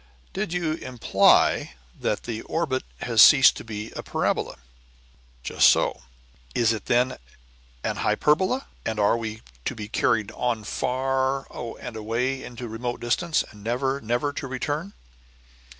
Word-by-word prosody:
"Did 195 -2 -3
you 170 -3 0
imply 130 - +2 0.2
that - - -1
the 115 -2 -4
orbit 150 -6 -1 0.2
has 115 -3 +4
ceased 135 +5 +8
to - - -7
be 110 0 -6
a - - -6
parabola?" - - -1 0.9
"Just - - +5
so." - - +1 0.5
"Is 115 -1 +3
it 110 - -6
then 125 +1 +2 0.7
an - - -2
hyperbola? 185 - +1 0.2
and 110 -1 -3
are 105 +2 +4
we 110 -1 -5 0.2
to - - -2
be 105 -1 -6
carried 105 -1 +1
on 120 -3 -2
far 135 +3 -1 0.3
and 125 -2 -7
away 115 +5 -2
into 120 0 -7
remote 120 +2 -4
distance, 155 +8 +1
and 105 -1 -15
never, 130 +4 -1
never 120 +6 -1
to 140 - -5
return?" 145 +8 -3
125 Hz, 140 wpm, -25 LUFS, 115-135 Hz, 0.9 s, ceased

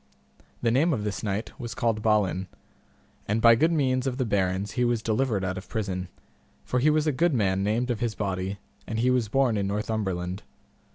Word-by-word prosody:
The 115 - +3
name 155 +7 +3
of 110 -6 -2
this 105 -1 -3
knight 105 +1 -2
was 120 -5 -5
called 115 -2 0
Balin, 105 -4 +1 0.8
and 105 +2 +1
by 115 0 +7
good 160 +9 +3
means 130 -4 +1
of 125 -1 -2
the 130 - 0
barons 100 -1 0
he 125 - 0
was 120 -2 +1
delivered 110 -3 0
out 95 0 -2
of 95 - -14
prison, 95 -4 -3 0.6
for 125 - 0
he 145 +5 +4
was 155 0 +2
a 155 - +3
good 160 +2 +2
man 95 -4 +1
named 115 +5 0
of 115 - -2
his 115 -2 -1
body, 95 -1 -2 0.3
and 110 - -3
he 125 +3 +3
was 125 -3 +1
born 130 -3 +2
in 100 -1 0
Northumberland. 100 -3 -2
110 Hz, 205 wpm, -26 LUFS, 100-125 Hz, 0.8 s, by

